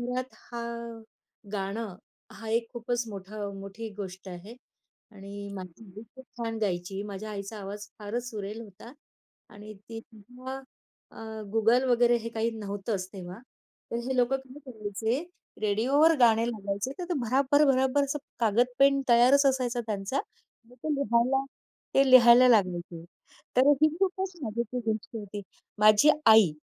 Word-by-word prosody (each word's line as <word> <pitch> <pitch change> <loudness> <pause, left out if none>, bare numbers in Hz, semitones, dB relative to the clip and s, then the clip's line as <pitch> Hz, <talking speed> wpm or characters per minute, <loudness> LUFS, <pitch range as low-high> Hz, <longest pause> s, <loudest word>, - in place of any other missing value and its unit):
घरात 250 +1 -4
हा, 235 -1 -8 0.9
गाणं 200 +1 -3 0.4
हा 225 +2 -9
एक 230 +1 +1
खूपच 240 0 -2
मोठा 205 0 -6
मोठी 200 +3 -7
गोष्ट 190 -1 -7
आहे. 185 +5 -9 0.6
आणि 200 0 -9
माझी 185 +2 -9
आई 215 - -8
खूप 260 - -12
छान 225 -1 -3
गायची. 190 0 -2
माझ्या 210 +1 -7
आईचा 200 +1 -6
आवाज 205 +1 -7
फारच 235 +4 -4
सुरेल 210 0 -6
होता. 220 +3 -13 0.6
आणि 210 +1 -11
ती 225 +3 -10
तेव्हा 245 +4 -10 0.5
अ, 220 -1 -8
Google 225 +3 +4
वगैरे 240 0 +4
हे 230 0 -6
काही 225 +1 0
नव्हतंच 200 -2 -4
तेव्हा. 185 -1 -8 0.5
तर 235 - -2
हे 265 - -1
लोकं 250 +2 +3
काय 265 +1 -13
करायचे, 220 +4 -2 0.4
रेडिओवर 260 +10 +4
गाणे 230 -1 +5
लावायचे. 200 +2 -3
तर 360 - -3
ते 355 - 0
भराभर, 270 +5 +3
भराभर 265 +2 +2
असं 280 +2 -3 0.2
कागद, 230 +2 +3
पेन 275 0 +5
तयारच 250 +4 +6
असायचा 255 -3 +1
त्यांचा. 210 +5 -2 0.5
मग 250 - -18
ते 310 -1 0
लिहायला 265 0 +2 0.5
ते 270 -1 +4
लिहायला 250 0 +8
लागायचे. 175 -6 +1 0.5
तर 255 - +5 0.2
ही 310 - +7
खूपच 380 0 0
मजेची 235 +1 -3
ती 230 -2 -2
गोष्ट 220 +1 -4
होती. 205 -1 -6 0.4
माझी 215 +6 +6 0.2
आई, 220 -7 +7
225 Hz, 145 wpm, -28 LUFS, 205-250 Hz, 0.9 s, लिहायला